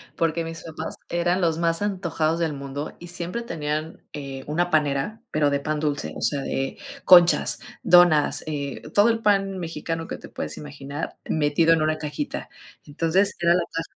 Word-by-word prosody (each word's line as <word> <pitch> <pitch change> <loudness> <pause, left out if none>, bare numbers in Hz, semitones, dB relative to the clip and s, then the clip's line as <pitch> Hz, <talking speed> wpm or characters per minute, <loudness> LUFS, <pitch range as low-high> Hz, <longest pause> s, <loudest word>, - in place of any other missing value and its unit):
porque 165 0 0
mis 165 0 -7
papás 160 0 -6
eran 175 +2 +1
los 165 -2 +1
más 165 +1 +1
antojados 170 -5 -1
del 165 -3 0
mundo, 140 +1 -6
y 175 - -10
siempre 175 +5 -4
tenían, 155 -6 -4
eh, 135 -2 -6
una 175 +4 0
panera 150 +7 0
pero 150 -1 +2
de 140 0 0
pan 155 +1 -2
dulce, 150 -1 -2
o - - -7
sea, 140 -2 +1
de 135 0 -3 0.3
conchas, 175 -1 +7 0.2
donas, 175 -4 +5
eh, 140 -3 -4
todo 205 +3 +5
el 230 -1 0
pan 195 -2 +2
mexicano 165 -1 -4
que - - -5
te - - -11
puedes - - -5
imaginar 145 +1 -7
metido 160 +2 +3
en 165 - +2
una 155 0 +1
cajita. 150 -1 -5 0.4
Entonces, 165 +7 +1
era 170 0 +4
la 180 - +2
ta 165 0 -1
165 Hz, 175 wpm, -24 LUFS, 150-175 Hz, 0.4 s, conchas